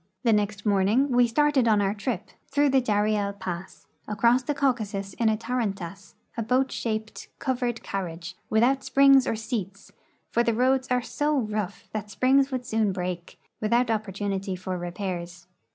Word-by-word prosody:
The 230 -3 +4
next 205 0 0
morning 210 +7 +3
we 245 -1 +5
started 275 0 +2
on 215 -2 +4
our 200 0 +1
tri}>, 210 -1 -2 0.3
through 285 +1 +2
the 265 -1 +4
Dariel 210 -2 +1
pass, 190 -2 -7 0.2
across 235 +5 +3
the 285 +3 -2
Caucasus 215 -8 -1
in 225 +2 +1
a 215 - +1
tarantass, 200 -6 -4 0.2
a 230 - -2
boat 255 +4 +1
shaped, 220 -1 -4
covered 245 -3 -2
carriage 180 -2 -5
without 245 +5 +3
springs 275 -1 +5
or - - 0
seats, 210 -3 -5 0.4
for 235 - +3
the 235 -1 +1
roads 260 +2 +2
are 250 -1 +1
so 295 +3 0
rough 210 -5 -3
that 210 -1 -4
springs 265 +7 +3
would 255 -1 -3
soon 220 -4 +1
break, 180 -1 -5 0.2
without 235 +3 +2
opportunit}" 200 -3 -2
for 185 0 -4
repairs. 175 -1 -5
215 Hz, 160 wpm, -26 LUFS, 195-250 Hz, 0.4 s, we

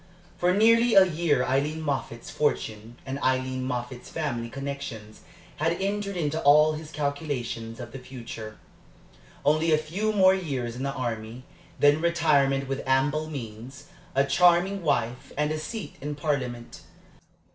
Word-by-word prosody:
For 180 +1 +2
nearly 230 +4 +4
a 195 -1 +9
year 165 -6 +1
Aileen 145 +5 0
Moffatt's 125 -5 -3
fortune 115 -5 -2
and 135 +1 -4
Aileen 130 0 0
Moffatt's 125 0 -5
family 120 -7 -3
connections 135 -5 -6 0.4
had 165 +3 0
entered 200 0 -2
into 155 -1 -1
all 150 +2 +6
his 155 0 -7
calculations 140 -6 -3
of 120 -2 -7
the 135 - -7
future. 115 -4 -8 0.9
Only 155 +3 +3
a 155 - +5
few 175 +8 -2
more 190 -3 +5
years 135 -11 -3
in 125 - -6
the 140 0 -1
army, 120 -2 -4 0.4
then 145 +2 +5
retirement 145 -5 +2
with 135 0 -2
ample 145 +4 +1
means, 125 -1 -8 0.3
a 135 +1 +4
charming 180 +6 +3
wife, 125 -6 -1
and 150 +1 +1
a 155 - -2
seat 215 +7 -6
in 145 +1 -4
Parliament. 130 -6 -3
140 Hz, 145 wpm, -26 LUFS, 125-160 Hz, 0.9 s, a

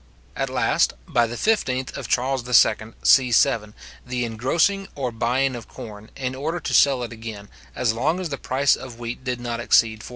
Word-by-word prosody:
At 135 -1 -2
last, 125 -3 +1
by 120 -1 +2
the 120 - -6
15th 130 - 0
of 135 -5 -6
Charles 130 +1 0
II. 125 - -5 0.5
c.7, 115 -4 +4 0.3
the 125 -1 -2
engrossing 165 - 0
or 130 -3 -2
buying 125 +4 0
of 115 -3 -9
corn, 105 -1 -10
in 130 -1 -3
order 155 +6 -3
to - - -4
sell 135 -3 +4
it 120 - -6
again, 110 -3 -8 0.3
as 115 -3 +1
long 150 +10 0
as 180 -3 -4
the 140 - -4
price 135 +2 +2
of 125 -3 -10
wheat 120 +1 -6
did 125 -2 -3
not 120 -1 -4
exceed 110 -2 +3
48s. - - -10
125 Hz, 190 wpm, -23 LUFS, 115-135 Hz, 0.5 s, c.7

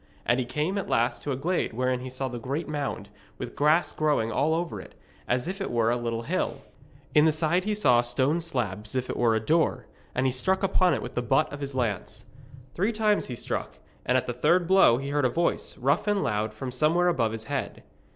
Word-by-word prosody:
And 120 +2 +2
he 125 - -2
came 155 +9 -1
at 195 - -5
last 115 +1 +1
to - - -5
the 135 - 0
glade 165 +1 -1
wherein 125 +2 0
he 130 +1 -6
saw 130 +1 -3
the 120 -1 -5
great 140 +8 -3
mound, 140 -9 -4 0.3
with - - -7
grass 155 +4 +3
growing 145 -8 0
all 155 +6 +1
over 170 +1 -3
it, - - -14 0.3
as 125 +4 0
if 195 +2 -4
it - - -2
were 115 -1 +2
a - - +2
little 115 -1 -3
hill. - - -2 0.5
In 150 +1 +6
the 160 - +5
side 160 +4 0
he 210 0 0
saw 125 -13 +4
a - - +2
stone 135 +7 +1
slab 110 - -3
as 105 - -9
if 130 -1 -1
it - - -4
were 115 -2 +2
a - - +2
door, 160 +9 +1 0.3
and 125 - +1
he 130 - +3
struck 190 +10 0
upon 185 -2 +3
it - - -4
with - - -7
the - - -1
butt 135 +4 +1
of 145 - -7
his 140 -1 -5
lance. 110 -2 -3 0.5
Three 200 +6 0
times 215 -2 +1
he 125 - -5
struck, - - -4 0.3
and 125 - +2
at 130 - -1
the 120 - -3
third 170 +8 +2
blow 185 -10 +5
he 135 +2 -4
heard 145 0 0
a - - +4
voice, 170 +6 -1
rough 140 - +1
and 205 -1 +2
loud, 105 0 -1
from 125 +4 -6
somewhere 155 +7 +2
above 120 -10 +1
his 110 0 -5
head. - - -4
135 Hz, 240 wpm, -27 LUFS, 120-170 Hz, 0.5 s, In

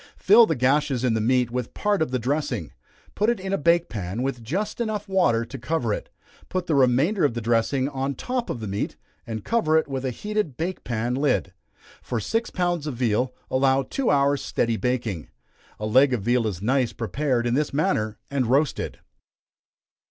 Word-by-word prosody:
Fill 220 +3 +6
the 160 - 0
gashes 130 0 +1
in 125 -3 +2
the 110 - 0
meat 125 +1 +2
with 125 -1 -4
part 205 -3 +1
of 160 - +1
the 130 - 0
dressing, 125 - -2 0.4
put 210 +2 +1
it 235 - +1
in 190 +1 -4
a - - +4
bake 170 +2 +3
pan, 105 +2 -4
with 135 -3 -2
just 200 - -3 0.3
water 185 -11 +3
enough - - -10
to 135 +2 -8
cover 120 -4 -1
it; - - -5 0.4
put 185 -1 -2
the 165 - 0
remainder 140 - +3
of 140 -5 +2
the - - -1
dressing 120 +4 +1
on 135 -1 -2
top 250 - -3
of 120 - -4
the 110 - -4
meat, 100 +1 -3 0.3
and 110 -2 -5
cover 160 -9 +2
it 160 - +1
with 135 -2 -4
a 130 - 0
heated 210 - -3
bake 180 +3 -3
pan 120 0 -2
lid. 130 -8 0 0.5
For 120 - -3
six 225 - -1
pounds 175 -4 -1
of 145 - -3
veal, 125 +1 +1 0.2
allow 135 +1 +3
two 265 - -1
hours' 140 0 +2
steady 115 -1 0
baking. 115 - -2 0.5
A 105 - -3
leg 130 +5 +4
of 105 - -5
veal 120 0 +2
is 95 -3 -4
nice 130 +1 +1
prepared 120 +3 -1
in 120 - +1
this 145 +3 +1
manner, 110 -7 0
and 135 -4 0
roasted. 140 +4 +1
130 Hz, 195 wpm, -24 LUFS, 120-155 Hz, 0.5 s, Fill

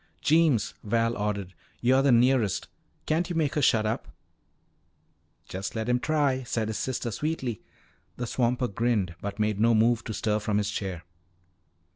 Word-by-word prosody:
"Jeems," 150 -9 +3
Val 115 +2 +1
ordered, 100 -3 -3 0.3
"you're 130 +6 +4
the 140 -1 +4
nearest. 120 -4 +3 0.4
Can't 165 +3 0
you 175 - -3
make 155 -3 +1
her 150 - 0
shut 110 -4 +3
up?" 110 +1 -2 1.4
"Just 95 +3 -5
let 110 0 -2
him 125 0 +2
try," 145 -2 +1
said 115 -3 -2
his 110 - -3
sister 120 -2 -2
sweetly. 130 - -3 0.6
The 120 - -3
swamper 125 +1 0
grinned 105 -4 0
but 100 0 -5
made 105 -1 0
no 115 +1 +4
move 115 +1 +3
to 110 - -4
stir 105 -1 0
from 105 -1 -1
his 105 0 0
chair. 95 -5 -4
115 Hz, 160 wpm, -27 LUFS, 105-130 Hz, 1.4 s, you're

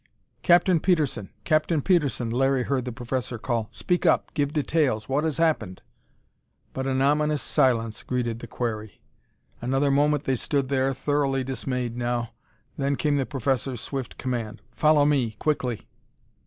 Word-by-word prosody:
"Captain 175 0 +4
Petersen! 150 - 0
Captain 155 0 +2
Petersen!" 140 -8 +1
Larry 135 +1 +2
heard 130 -1 -1
the 125 - -3
professor 120 0 -3
call. 115 -1 -2
"Speak 180 0 -1
up! - - +2
Give 145 -2 0
details! 150 -7 0
What 140 +3 0
has 160 -3 -1
happened?" 155 - 0 0.9
But 130 0 -3
an 130 0 +1
ominous 150 0 +2
silence 115 -4 +1
greeted 120 -3 -2
the - - -8
query. 110 -4 -4 0.6
Another 135 +3 +1
moment 145 +1 +2
they 130 -2 0
stood 140 +1 -1
there, 135 -1 +2
thoroughly 135 -1 0
dismayed 125 -2 -3
now. 120 -1 -2 0.5
Then 140 0 +1
came 145 0 +1
the 135 - -1
professor's 135 -2 -1
swift 135 -4 -5
command: 120 -4 -4
"Follow 150 -2 +4
me 130 -7 +1
quickly!" 130 -7 -1
135 Hz, 145 wpm, -25 LUFS, 120-145 Hz, 0.9 s, Captain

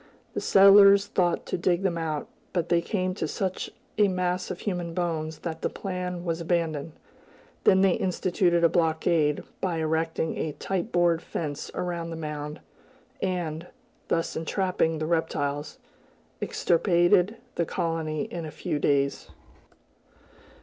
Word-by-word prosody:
The - - -2
settlers 200 0 +7
thought 175 -3 0
to - - -3
dig 175 +1 +1
them 185 -3 +1
out, 160 -3 -3 0.3
but 175 -3 -1
they 170 0 +3
came 185 0 -1
to 170 -4 -3
such 185 +3 -3 0.3
a 210 - +6
mass 180 -1 -1
of 180 - -5
human 175 -4 -3
bones 160 -3 -2
that 160 -2 -5
that - - 0
plan 180 -2 -4
was 165 0 -1
abandoned. 165 -3 -1 0.7
Then 190 -1 +6
they 195 -1 +5
instituted 175 -1 +1
a - - +8
blockade, 160 -2 +1 0.2
by 180 -3 0
erecting 160 0 -1
a 155 - -2
tight 195 +7 -3
board 175 -1 +3
fence 150 -4 -4
around 170 -2 -3
the 165 - -5
mound, 150 -1 -5 0.6
and, 175 -3 -2 0.4
thus 165 - -1
entrapping 165 -1 0
the 155 - -2
reptiles, 150 -3 -1 0.6
extirpated 175 +4 +3 0.2
the 170 - 0
colony 160 -2 -2
in 170 - -5
a 155 - -5
few 155 -1 -3
days. 140 -1 +1
170 Hz, 140 wpm, -27 LUFS, 160-180 Hz, 0.7 s, a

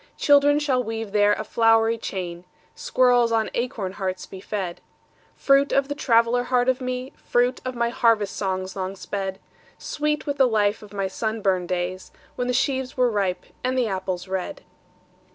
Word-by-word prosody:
Children 290 0 +5
shall 270 -4 +1
weave 225 -2 -5
there 205 0 +4
a - - -3
flowery 225 0 +3
chain, 175 -4 -5 0.3
Squirrels 245 -2 +3
on 225 -1 +1
acorn 225 -6 -2
hearts 190 -1 -4
be 190 - -10
fed:— 190 -4 -4 0.5
Fruit 275 0 +3
of 275 0 +2
the - - -1
traveller 240 -2 +2
heart 245 0 +1
of 260 0 +1
me, 255 +1 -4
Fruit 245 +1 0
of 255 -1 -4
my 235 0 +1
harvest 230 -4 +2
songs 190 -1 -3
long 190 0 -4
sped: 195 0 -4 0.4
Sweet 300 0 -2
with 285 -1 -2
the 265 - +5
life 210 -2 +1
of 210 -2 -13
my 195 -2 -2
sunburned 195 -3 -1
days 185 +1 -3 0.2
When 245 - -2
the - - +1
sheaves 260 +1 -1
were 250 -1 +3
ripe, 195 -4 -1 0.2
and 255 +1 0
the 250 - +2
apples 190 -2 -3
red. 190 +9 -4
225 Hz, 170 wpm, -24 LUFS, 195-255 Hz, 0.5 s, Children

